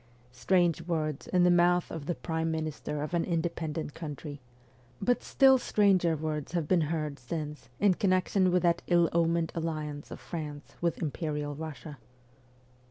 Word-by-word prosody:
Strange 170 +6 +2
words 155 -4 -2
in 180 -1 +3
the 180 - +5
mouth 175 0 +3
of 150 -3 -6
the 175 - 0
prime 160 -1 -2
minister 155 -2 -3
of 155 - -5
an 170 -1 +2
independent 160 -3 -2
country; 150 -3 -7 0.6
but 245 0 +1
still 265 -1 +5
stranger 190 -8 +3
words 155 0 -4
have 170 -4 -1
been 180 0 +3
heard 155 -3 -2
since 150 -2 -5
in 200 -2 +5
con 195 +1 0
nection 185 0 +2
with 180 0 +2
that 170 0 +3
ill 175 -1 +4
omened 170 -1 +2
alliance 155 -3 -4
of - - -8
France 150 -4 -7
with 170 -1 0
imperial 150 -1 -3
Kussia. 155 -1 -7
165 Hz, 160 wpm, -30 LUFS, 150-175 Hz, 0.6 s, the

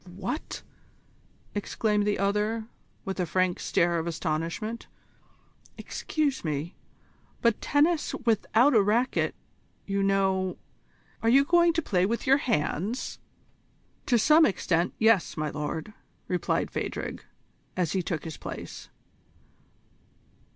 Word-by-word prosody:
"What!" 200 - -4 0.9
exclaimed 210 0 0
the 205 - +1
other, 210 +3 0 0.4
with 195 -1 -4
a 180 - 0
frank 185 +1 +1
stare 170 -1 +1
of 165 - -3
astonishment. 170 +8 -3 0.9
"Excuse 295 -4 -2
me, 155 +2 -3 0.7
but 235 -2 +3
tennis 305 +2 +2
without 230 +4 +3
a 220 - +6
racquet, 225 +6 +1 0.5
you 200 0 -1
know 190 -1 +1 0.6
are 225 - +2
you 275 +3 +6
going 345 +2 +5
to 330 0 0
play 185 -5 +2
with 230 +2 -2
your 270 +1 +5
hands?" 215 - -1 0.9
"To 245 - +4
some 305 +8 +6
extent, 175 - +1
yes, 220 -7 +3
my 155 -1 -1
lord," 150 +6 -4 0.3
replied 180 -1 0
Phadrig, - - -4 0.5
as 175 -4 +1
he 190 - +1
took 165 -2 -3
his 160 -3 -6
place. - - -8
200 Hz, 115 wpm, -27 LUFS, 175-235 Hz, 0.9 s, a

